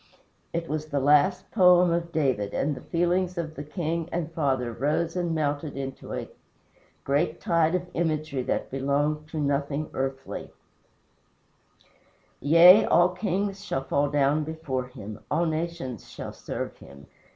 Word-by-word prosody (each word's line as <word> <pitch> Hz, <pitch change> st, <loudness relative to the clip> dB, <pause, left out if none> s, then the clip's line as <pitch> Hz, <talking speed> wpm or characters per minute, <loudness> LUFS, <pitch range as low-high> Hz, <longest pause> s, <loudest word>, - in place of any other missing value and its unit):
It 165 Hz, 0 st, -3 dB
was 155 Hz, +1 st, -3 dB
the 145 Hz, -2 st, -1 dB
last 150 Hz, +7 st, +3 dB
poem 180 Hz, -3 st, +6 dB
of 170 Hz, 0 st, -1 dB
David, 130 Hz, -11 st, 0 dB
and 145 Hz, +2 st, 0 dB
the 130 Hz, -, -8 dB
feelings 180 Hz, +1 st, 0 dB
of 160 Hz, -2 st, -3 dB
the 145 Hz, -, -7 dB
king 165 Hz, +1 st, -3 dB
and 165 Hz, -2 st, -3 dB
father 130 Hz, -7 st, 0 dB
rose 150 Hz, +7 st, -1 dB
and 175 Hz, -2 st, -1 dB
melted 145 Hz, -1 st, -2 dB
into 135 Hz, -1 st, -6 dB
a -, -, -4 dB, 0.8 s
great 150 Hz, +4 st, 0 dB
tide 170 Hz, 0 st, +2 dB
of 180 Hz, 0 st, -2 dB
imagery 155 Hz, -4 st, -1 dB
that -, -, -2 dB
belonged 145 Hz, +3 st, 0 dB
to 160 Hz, -, -7 dB
nothing 145 Hz, +1 st, -1 dB
earthly: 135 Hz, 0 st, -4 dB, 1.9 s
"Yea, 170 Hz, +7 st, +8 dB
all 175 Hz, +1 st, +5 dB
kings 195 Hz, +1 st, -2 dB
shall 135 Hz, -9 st, -2 dB
fall 140 Hz, +1 st, +1 dB
down 145 Hz, +1 st, +2 dB
before 150 Hz, -5 st, -4 dB
him; 105 Hz, -4 st, -9 dB
All 165 Hz, +3 st, +1 dB
nations 160 Hz, -, -4 dB
shall -, -, -7 dB
serve -, -, -5 dB
him. 70 Hz, 0 st, -14 dB
155 Hz, 145 wpm, -26 LUFS, 140-170 Hz, 1.9 s, Yea